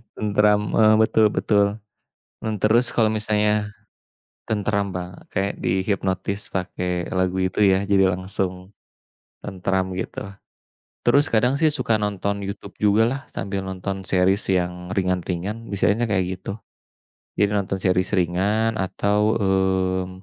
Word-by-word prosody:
Tenteram, 105 0 +3
mmm, 110 -1 +5
betul 110 0 +4
betul. 100 -1 +1 0.7
Mmm, 110 -1 -2
terus 115 +5 +3
kalau 115 - +2
misalnya 105 -1 +1 0.8
tentram 100 -2 -1
ba 90 0 -7
kayak 100 +1 -1
dihipnotis 95 +1 -1
pakai 90 -1 -2
lagu 95 0 0
itu 95 0 -2
ya, 95 0 +4
jadi 95 -2 +4
langsung 95 0 -4 0.7
tenteram, 95 0 -2
gitu. - - -5 0.8
Terus 140 +4 +4
kadang 120 +4 +2
sih, 155 +1 +3
suka 130 -6 0
nonton 100 0 -2
YouTube 100 0 -7
jugalah, 115 +6 +2
sambil 100 0 -3
nonton 95 +1 -4
series 95 +2 +3
yang 90 -1 -1
ringan-ringan, 90 +4 -2
biasanya 105 +3 +1
kayak 95 -2 -1
gitu. 100 - -5 0.8
Jadi 100 -1 +3
nonton 95 -1 -1
series 90 0 +1
ringan 100 +6 +1
atau, 100 +2 0 0.2
mmm, 95 -2 +1
100 Hz, 120 wpm, -23 LUFS, 95-105 Hz, 0.8 s, mmm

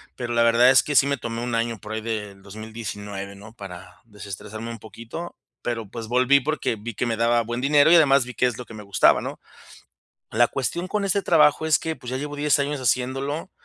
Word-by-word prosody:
pero 120 -1 -4
la 115 - +3
verdad 115 +2 +5
es 135 - +6
que 150 - -3
sí 140 +1 +5
me 140 - 0
tomé 115 0 -5
1 120 -1 -2
año 115 -1 -1
por 110 0 -8
ahí 110 - -3
del 105 -3 -5
2019, 105 -1 -7
¿no? 105 +3 -13
Para 95 -3 -11
desestresarme 105 +1 -8
un 115 - -7
poquito. 115 +10 -9 0.3
Pero, 115 -3 -3
pues 115 0 -7
volví 130 +3 +4
porque 150 -3 -1
vi 115 +2 -7
que 120 - -2
me 115 - -1
daba 115 +1 +2
buen 120 +2 -4
dinero 145 +2 +5
y 170 - +7
además 140 -5 +5
vi 125 - -8
qué - - +1
es 120 -3 -3
lo 125 - -7
que 115 - -13
me 105 -1 -9
gustaba, 100 0 +3
¿no? - - -6 0.9
La 120 +2 +4
cuestión 170 +7 -3
con 210 +1 -1
ese 195 +1 +1
trabajo 155 -2 +4
es 155 -2 +4
que, 160 -1 -3
pues, 125 - -9
ya 130 - -2
llevo 145 +2 -5
10 145 0 +2
años 140 0 -2
haciéndolo 135 +6 -1
120 Hz, 230 wpm, -23 LUFS, 110-140 Hz, 0.9 s, y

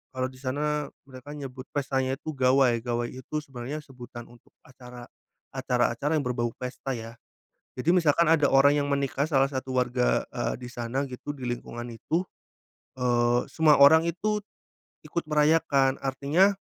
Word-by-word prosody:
kalau 130 0 0
di 130 - -16
sana 145 +2 -1 0.2
mereka 135 +2 -11
nyebut 130 -2 -8
pestanya 135 -1 0
itu 155 +2 -6
gawai 130 -3 +3
gawai 120 0 -2
itu 130 +4 -9
sebenarnya 140 +3 -7
sebutan 120 -2 -10
untuk 120 - -21
acara, 125 -1 -12 0.5
acara-acara 130 +2 0
yang 145 - 0
berbau 120 -2 -2
pesta 125 +1 -5
ya, 115 0 -9 0.5
jadi 130 +6 -2
misalkan 170 -2 +4
ada 155 -3 +4
orang 140 +2 +5
yang 145 - 0
menikah 140 0 0
salah 135 -3 +2
satu 130 -1 -4
warga, 125 0 +1
eee, - - -2
di 125 - -7
sana 120 +2 -3
gitu 135 +3 -6
di 125 -3 -5
lingkungan 120 0 -5
itu, 155 +9 -2 0.8
eee, 120 0 +2
semua 155 -3 +4
orang 160 +4 +8
itu, 205 +5 -1 0.6
ikut 170 - -3
merayakan 150 -3 +3
artinya, 145 +9 +2
135 Hz, 150 wpm, -27 LUFS, 125-150 Hz, 0.8 s, orang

